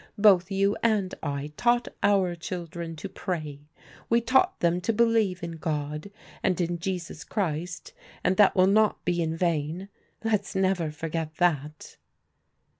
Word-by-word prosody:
Both 195 -3 +5
you 195 +1 +2
and 210 -5 +1
I 145 0 -4
taught 240 -1 +2
our 195 -3 +3
children 170 -1 -6
to 160 +5 -6
pray. 155 -7 -4 0.5
We 235 - +4
taught 265 +11 +2
them 175 +1 +2
to 230 - +1
believe 220 -5 +2
in 170 -1 -5
God, 150 +1 -3 0.3
and 185 -2 +1
in 175 -1 -1
Jesus 175 -3 -4
Christ, 180 - -3 0.3
and 185 - +2
that 205 -2 +6
will 185 -1 +5
not 210 +2 +3
be 175 -1 +1
in 160 0 -1
vain. 170 +2 -1 0.3
Let's 210 -4 0
never 190 -4 +1
forget 160 +1 -4
that." 155 -4 -1
180 Hz, 145 wpm, -27 LUFS, 165-200 Hz, 0.5 s, that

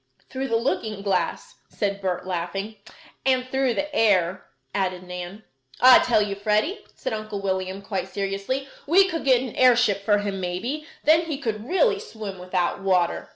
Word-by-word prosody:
"Through 265 +1 -3
the 230 - 0
looking 220 -3 -1
glass!" 185 -8 -1
said 200 -1 -2
Bert, 185 -2 -2
laughing. 190 +4 -4 0.5
"And 255 -1 +2
through 265 -2 0
the 295 0 -3
air," 190 - +2 0.3
added 185 -2 -1
Nan. 180 +3 -7 0.4
"I 255 0 +9
tell 220 -4 +3
you, 205 -1 -3
Freddie," 215 - 0
said - - -4
Uncle 215 -2 -4
William, 190 0 -3
quite 195 -2 -3
seriously: 200 +8 -3 0.2
"we 380 +5 +6
could 330 -3 -3
get 255 -2 +4
an 250 - -7
airship 240 -6 +4
for 205 0 +3
him 200 -1 -3
maybe; 225 - -3 0.2
then 320 +2 +4
he 305 -4 -2
could 225 -5 -4
really 410 +3 +3
swim 215 - -8
without 180 +1 -1
water." 185 -3 +1
210 Hz, 165 wpm, -24 LUFS, 190-255 Hz, 0.5 s, I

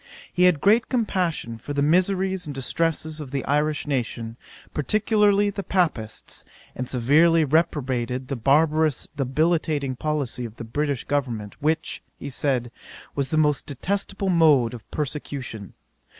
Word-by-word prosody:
He 180 - +4
had 170 -6 +4
great 220 +4 +4
compassion 180 - -1
for 145 - -6
the 140 0 +1
miseries 185 +2 +1
and 145 - -5
distresses 155 +3 -1
of 145 - -7
the 135 0 -3
Irish 150 +2 +1
nation, 115 -5 -3 0.4
particularly 205 - +2
the 200 - -4
Papists; 160 - -2 0.3
and 125 0 -4
severely 155 +6 +4
reprobated 130 -5 0
the 135 - -2
barbarous 150 +3 +2
debilitating 145 0 0
policy 140 -4 -2
of 115 -2 -7
the - - -7
British 140 +3 -2
government, 120 -8 -2
which, 160 +2 0 0.2
he 140 - -7
said, 125 -3 -1 0.4
was 140 -1 -1
the 155 - 0
most 150 -2 +2
detestable 195 +6 -2
mode 150 -9 +4
of 115 -4 -10
persecution. 135 - -5
150 Hz, 135 wpm, -24 LUFS, 130-165 Hz, 0.4 s, He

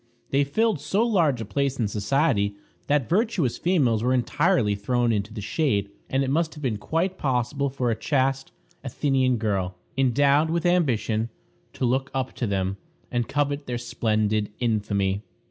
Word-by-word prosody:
They 140 +1 +3
filled 205 +6 +1
so 205 +9 +1
large 165 - +2
a - - -4
place 140 +5 -1
in 115 - +1
society 105 -1 +1 0.3
that 145 -4 +2
virtuous 190 - +1
females 135 - +2
were 125 +2 +2
entirely 120 -3 +2
thrown 120 +4 0
into 105 0 -2
the 110 -1 -6
shade, 100 - 0 0.2
and 135 +1 +1
it 135 - -1
must 160 +2 0
have 150 - -10
been 120 -5 0
quite 180 - -1
possible 135 +1 0
for 130 -3 -1
a - - 0
chaste 135 +2 0 0.3
Athenian 130 -1 +1
girl, 100 -4 -1 0.2
endowed 140 +4 +3
with 170 +1 -1
ambition, 120 -10 +1 0.4
to - - -2
look 130 +3 0
up 130 -1 -2
to 120 - -1
them, 95 -1 -1 0.3
and 120 -2 0
covet 145 0 -1
their 120 -1 -2
splendid 110 -3 0
infamy. 100 -4 0
130 Hz, 165 wpm, -25 LUFS, 110-145 Hz, 0.4 s, They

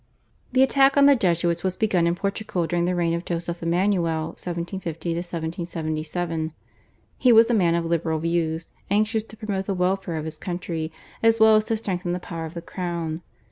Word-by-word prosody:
The 260 +1 +5
attack 270 +1 +4
on 280 - +7
the 280 0 +7
Jesuits 170 -5 +1
was 185 -1 -1
begun 185 -6 +2
in 170 - +1
Portugal 195 -2 -2
during 175 +1 0
the 180 0 0
reign 170 -1 +1
of 170 +1 -2
Joseph 170 0 -4
Emmanuel 170 -2 +1
(1750 170 -1 -4
1777). 165 -1 -3 0.7
He 255 - +5
was 230 +1 +7
a - - +3
man 175 -6 +3
of 170 0 0
liberal 165 -1 0
views, 165 0 -1 0.2
anxious 215 +2 +2
to 220 - -13
promote 200 -3 -3
the 195 - 0
welfare 180 -1 0
of 155 -1 -3
his 155 -1 -7
country, 170 -3 -4 0.3
as 225 0 +4
well 220 0 +7
as 215 0 +3
to 225 - 0
strengthen 180 -4 -2
the 180 - -2
power 165 -2 -6
of 160 +2 -9
the 170 - -6
crown. 170 -3 -4
175 Hz, 185 wpm, -24 LUFS, 165-200 Hz, 0.7 s, on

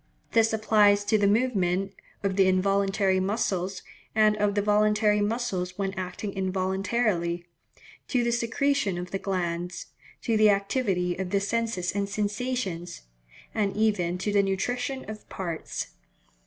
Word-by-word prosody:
This 225 -1 +4
applies 210 -2 +4
to 215 +1 +3
the 200 - +3
movements 195 -4 +1 0.3
of 195 -1 0
the 190 -1 +4
involuntary 195 0 +2
muscles, 190 -2 -1 0.3
and 215 -1 +5
of 205 -1 +1
the 205 - +2
voluntary 210 0 +3
muscles 205 -5 -2
when 195 -1 -2
acting 190 +2 -5
involuntarily,—to 190 +2 -2
the 235 - +1
secretion 235 -3 0
of 180 0 -6
the 195 - -2
glands,—to 180 +4 -3
the 215 0 +6
activity 195 -3 +1
of 190 -1 -2
the 200 +1 +2
senses 205 -3 -1
and 200 0 -2
sensations,—and 200 - -4
even 195 -5 +1
to 205 +3 -2
the 205 -1 +4
nutrition 245 +7 -2
of 215 0 -9
parts. 170 -4 -5
200 Hz, 130 wpm, -27 LUFS, 185-215 Hz, 0.3 s, the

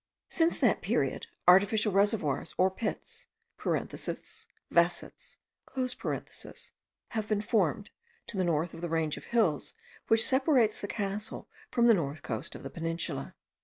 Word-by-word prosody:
Since 330 0 +2
that - - +3
period, - - 0 0.2
artificial 200 +3 +5
reservoirs, 195 -8 +1
or 185 +1 +4
pits, 220 +4 -5 0.4
(vasets,) - - -3 2.6
have 215 -2 -3
been 215 -1 +1
formed, 210 - +1 0.4
to - - -8
the 190 - +1
north 165 -1 0
of - - -9
the 175 - -3
range 160 -2 0
of - - -10
hills 200 - +1 0.3
which 225 0 +5
separates 260 -5 +3
the 205 - -3
castle 205 0 -3 0.2
from 235 - +2
the 235 - +8
north 155 -6 -2
coast 110 -3 -5
of - - -9
the 135 - -6
peninsula. 165 -4 -3
195 Hz, 130 wpm, -30 LUFS, 165-220 Hz, 2.6 s, the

